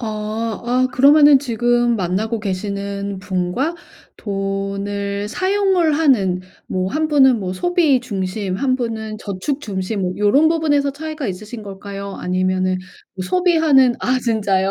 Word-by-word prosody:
어. 235 - -4 0.6
아 250 +1 +2
그러면은 285 +2 +6
지금 240 -2 +1
만나고 205 +5 -1
계시는 200 0 -4
분과 190 - -2 0.4
돈을 200 0 -3
사용을 375 - +1
하는 235 - +2 0.3
뭐 185 0 -1
1 310 +7 -1
분은 265 -6 +4
뭐 185 -2 -3
소비 320 - +2
중심, 195 -4 -3
1 255 +4 +1
분은 220 -3 -4
저축 210 +9 -4
중심 195 -2 -3
뭐 180 -1 -1
요런 230 +10 +4
부분에서 290 -4 +1
차이가 310 -1 -5
있으신 210 +4 -6
걸까요 200 0 -7
아니면은 185 0 0 0.4
뭐 185 - -4
소비하는 320 -8 +4
아 255 +1 +1
진짜요? 200 -5 +1
220 Hz, 270 characters per minute, -19 LUFS, 195-280 Hz, 0.6 s, 그러면은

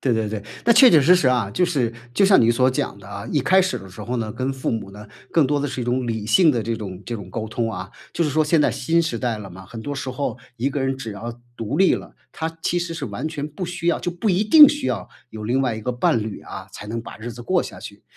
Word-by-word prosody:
对 130 - +1
对 110 -1 0
对， 105 -1 -4 0.2
那 235 - +6
确 245 +3 +8
确 160 - +7
实 170 +6 +6
实 180 - +1
啊， 120 -6 +1
就 180 - +2
是， 135 -10 0 0.2
就 195 - +4
像 195 0 +6
你 115 - +4
所 125 +2 +3
讲 125 -5 -3
的 95 - -13
啊， 100 0 -7
一 150 - +2
开 185 +8 +4
始 185 0 0
的 95 - -11
时 95 +3 -10
候 120 +5 -3
呢， 110 -2 -3
跟 130 +3 -2
父 135 -1 -3
母 110 -4 -3
呢， 105 +1 -11 0.2
更 160 -5 +4
多 145 +1 +1
的 145 - -1
是 130 -2 -4
一 120 - -2
种 125 +1 0
理 110 -2 -3
性 160 - +5
的 120 -6 -1
这 115 +1 -2
种 95 -3 -7
这 120 - -3
种 100 -5 -8
沟 110 +2 -4
通 115 0 -2
啊。 - - -6 0.2
就 170 - 0
是 155 - +1
说 155 +2 +2
现 155 +1 +3
在 - - +3
新 165 +6 +1
时 160 -8 -2
代 120 -3 -1
了 100 -2 -8
嘛， 95 +1 -11
很 115 +4 -9
多 145 +6 -4
时 130 -1 -4
候 130 0 -3 0.2
一 125 +4 0
个 140 0 -3
人 135 0 -1
只 115 -5 -6
要 115 +4 -7 0.2
独 115 +5 -3
立 190 -1 +5
了， - - -8 0.2
他 160 0 -4
其 175 - +1
实 170 -1 -3
是 155 -4 -4
完 115 +7 -4
全 150 -2 -4
不 155 +5 -6
需 175 -1 -5
要 170 - +3
就 175 - -3
不 175 +5 -2
一 190 +2 +2
定 295 +7 +9
需 295 -1 -2
要 - - -2 0.2
有 110 -1 -8
另 125 +5 +1
外 125 -4 0
一 110 - -6
个 125 - -2
伴 120 -2 +1
侣 110 -2 -6
啊， 95 0 -9
才 105 - -9
能 115 +2 -3
把 115 - -10
日 115 +2 -7
子 120 - -10
过 - - +1
下 - - -9
去。 - - -10
125 Hz, 325 characters per minute, -22 LUFS, 110-160 Hz, 0.2 s, 定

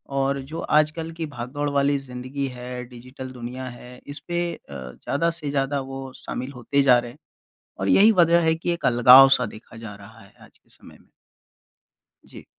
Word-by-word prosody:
और 135 0 0
जो 165 +1 -6
आजकल 155 +2 +1
की 165 0 -5
भागदौड़ 145 +1 -4
वाली 140 0 +1
ज़िंदगी 130 +1 -5
है, 125 -1 -7
डिजिटल 130 +2 -10
दुनिया 125 +1 -7
है, 125 0 -12
इस 145 +1 -7
पे 175 0 -2
अ, - - -16
ज़्यादा 70 - -3
से 145 -2 -4
ज़्यादा 140 0 -1
वो 135 -1 -7
शामिल 130 +3 -6
होते 140 +4 0
जा 125 -2 +6
रहे 120 0 -7
हैं, 135 - -19 0.6
और 95 - -1
यही 215 +3 +6
वजह 170 +1 +4
है 160 - +2
कि 170 +1 -2
अलगाव-सा 125 +1 +7
देखा 110 +1 -14
जा 110 -3 -9
रहा 100 -1 -15
है - - -19
आज - - -24
के - - -37
समय - - -13
में। - - -30 1.2
जी। - - -13
135 Hz, 180 wpm, -23 LUFS, 125-145 Hz, 1.2 s, अलगाव-सा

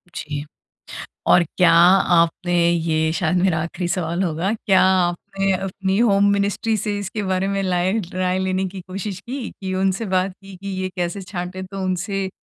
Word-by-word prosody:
जी। 150 -1 -5 0.9
और 175 - +6
क्या 175 -3 +5
आपने 175 0 +4 0.2
ये 160 -2 +1
शायद 175 0 0
मेरा 185 -4 +2
आखिरी 170 +2 -4
सवाल 175 0 -1
होगा, 175 +3 -1
क्या 190 -2 +5
आपने 185 +2 0
अपनी 190 +1 -2
होम 200 -3 +4
मिनिस्ट्री 200 +2 0
से 205 0 -2
इसके 205 +2 -4
बारे 190 0 0
में 195 0 -1
लाए 185 0 +1 0.2
राय 185 0 0
लेने 190 0 0
की 190 +1 -8
कोशिश 190 0 -5
की 230 -7 -5
उनसे 190 +3 0
बात 185 +1 +1
की 195 -1 -11
कि 200 +2 -8
ये 185 - -1
कैसे 180 +2 -2
छाँटे? 185 0 -5
तो 190 +1 -6
उनसे 190 +1 -2
185 Hz, 165 wpm, -21 LUFS, 175-195 Hz, 0.9 s, और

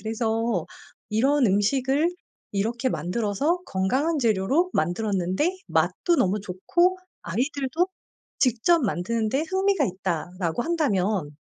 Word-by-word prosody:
그래서 225 -3 -1 0.4
이런 265 +4 +3
음식을 265 - +2 0.4
이렇게 230 +6 0
만들어서 220 - 0
건강한 265 - 0
재료로 235 - +2
만들었는데 190 - 0
맛도 345 -2 +1
너무 195 +2 +2
좋고 345 - +1 0.2
아이들도 275 - -1 0.5
직접 265 +6 +3
만드는 215 +3 -1
데 270 +6 0
흥미가 380 -4 +2
있다라고 180 0 -2
한다면 200 - 0
225 Hz, 270 characters per minute, -25 LUFS, 190-290 Hz, 0.5 s, 이런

